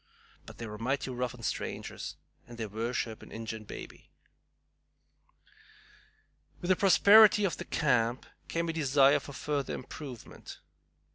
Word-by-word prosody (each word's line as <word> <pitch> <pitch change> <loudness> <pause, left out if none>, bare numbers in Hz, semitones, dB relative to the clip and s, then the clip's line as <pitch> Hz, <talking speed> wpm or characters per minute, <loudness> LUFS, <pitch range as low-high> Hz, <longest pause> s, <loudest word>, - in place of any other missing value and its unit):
But - - -11
they're 105 -2 -7
mighty 130 +3 -1
rough 125 0 -3
on 120 - -13
strangers, - - -4 0.3
and 120 - -11
they 115 - -3
worship 110 +1 -3
an - - -13
Ingin 110 -1 -6
baby." - - -10 2.5
With 175 - -5
the 185 - +5
prosperity 205 +2 +7
of 185 - -1
the - - -6
camp 125 -5 +1 0.2
came 170 0 -2
a 165 - -2
desire 140 -3 +4
for 140 - -10
further 145 -1 -2
improvement. 130 -2 -9
130 Hz, 130 wpm, -30 LUFS, 115-160 Hz, 2.5 s, prosperity